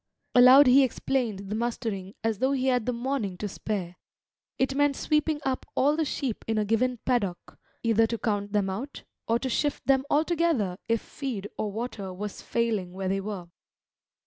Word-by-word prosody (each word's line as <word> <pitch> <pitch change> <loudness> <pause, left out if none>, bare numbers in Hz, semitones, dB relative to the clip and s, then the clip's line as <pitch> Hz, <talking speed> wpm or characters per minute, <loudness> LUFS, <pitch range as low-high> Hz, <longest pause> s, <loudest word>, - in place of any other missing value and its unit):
Aloud 255 +3 +9
he 265 +2 +7
explained 230 -6 -2
the - - 0
mustering 220 -4 -3
as 225 -3 0
though 265 +2 +2
he 260 -1 0
had 250 -3 +1
the - - +2
morning 235 -6 -2
to 210 - -3
spare. 190 -3 -4 0.6
It 265 +1 +1
meant 290 0 +2
sweeping 300 +1 +1
up 265 -1 -1
all 290 +3 +3
the 320 0 0
sheep 265 -5 -3
in 225 -1 0
a 210 - +1
given 245 +4 +1
paddock, 205 -9 -1 0.2
either 225 -1 +3
to 230 - -2
count 205 -3 -2
them 205 -2 +1
out, 230 +10 -5 0.2
or 230 - +3
to 260 - -3
shift 290 +3 -1
them 265 -1 +3
altogether 305 - +1
if 230 -1 +2
feed 225 -8 -5
or 210 - -2
water 210 -3 -5
was 200 +2 -6
failing 215 -6 -1
where 190 0 -3
they 195 +1 0
were. 195 -4 -6
230 Hz, 180 wpm, -27 LUFS, 205-265 Hz, 0.6 s, Aloud